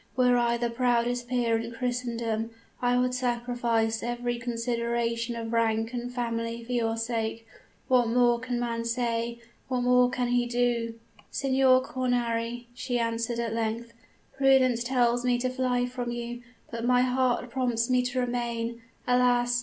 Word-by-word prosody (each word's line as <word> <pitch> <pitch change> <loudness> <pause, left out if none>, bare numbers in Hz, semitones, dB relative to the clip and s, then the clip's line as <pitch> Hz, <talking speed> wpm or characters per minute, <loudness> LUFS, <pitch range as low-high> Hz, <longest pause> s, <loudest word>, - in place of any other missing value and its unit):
Were 250 -1 +4
I 235 -1 +2
the 235 0 -1
proudest 245 0 +1
peer 240 -2 +1
in 230 +1 -6
Christendom, 235 -2 -2 0.3
I 245 0 +2
would 250 0 +1
sacrifice 240 -2 0
every 240 0 -2
consideration 235 0 -1
of 230 0 -5
rank 225 0 +1
and 245 0 -4
family 230 -1 -3
for 240 - -8
your 230 -2 0
sake. 225 -1 -2 0.4
What 250 -2 +4
more 240 0 +3
can 245 0 -3
man 230 -1 -2
say? 235 0 -1 0.3
What 255 -2 -1
more 250 0 +4
can 245 -1 -1
he 245 0 +2
do?' 240 -1 0 0.3
"'Signor 260 -1 +3
Cornari,' 240 -2 -1
she 245 0 -2
answered 230 0 -1
at 235 -1 -2
length, 230 +1 -2 0.4
'prudence 265 -3 +4
tells 240 -1 +2
me 250 -1 +2
to 255 +1 -1
fly 255 -1 0
from 245 -1 -4
you; 240 0 -5 0.3
but 230 -1 -4
my 250 +1 +4
heart 250 -1 +1
prompts 240 -3 0
me 250 -1 +3
to 250 +1 -1
remain. 235 -1 -2 0.3
Alas! 245 -1 +3
240 Hz, 155 wpm, -28 LUFS, 230-250 Hz, 0.4 s, Were